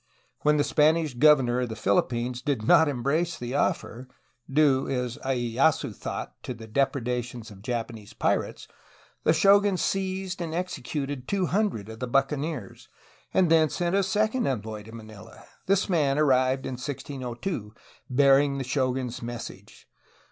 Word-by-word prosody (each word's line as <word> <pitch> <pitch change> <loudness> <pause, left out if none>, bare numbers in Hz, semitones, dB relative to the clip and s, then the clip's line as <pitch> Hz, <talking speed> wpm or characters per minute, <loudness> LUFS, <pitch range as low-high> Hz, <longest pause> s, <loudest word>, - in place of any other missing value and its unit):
When 150 0 +3
the 145 - +3
Spanish 155 0 +2
governor 125 -2 +4
of 125 - -2
the 110 - -5
Philippines 120 +4 0
did 130 -5 -1
not 160 +3 +6
embrace 145 +6 -1
the 120 +1 -5
offer, 130 -3 -1 0.4
due 135 -2 +3
as 125 -2 -2
lyeyasu 130 +3 +1
thought - - -6
to 125 - -6
the 115 0 -10
depredations 120 -1 -2
of 95 -1 -13
Japanese 115 -2 -5
pirates, - - -1 0.6
the - - +5
shogun 200 +3 +4
seized 190 -1 -2
and 165 -1 -3
executed 145 -6 -4
two 195 -2 0
hundred 185 - -1
of 110 0 -9
the 125 - -3
buccaneers, 135 - -2 0.4
and 180 -3 +3
then 160 -2 +5
sent 175 +4 -1
a 200 - +4
second 215 +6 0
envoy 110 -4 -3
to 110 +2 -13
Manila. 110 -3 -12 0.2
This 195 +1 +2
man 150 -7 +1
arrived 130 -2 +2
in 130 - -4
1602, 130 - -5 0.4
bearing 140 +1 +4
the 135 - -2
shogun^s 130 -2 -2
message. 120 0 -8
135 Hz, 145 wpm, -26 LUFS, 120-160 Hz, 0.6 s, not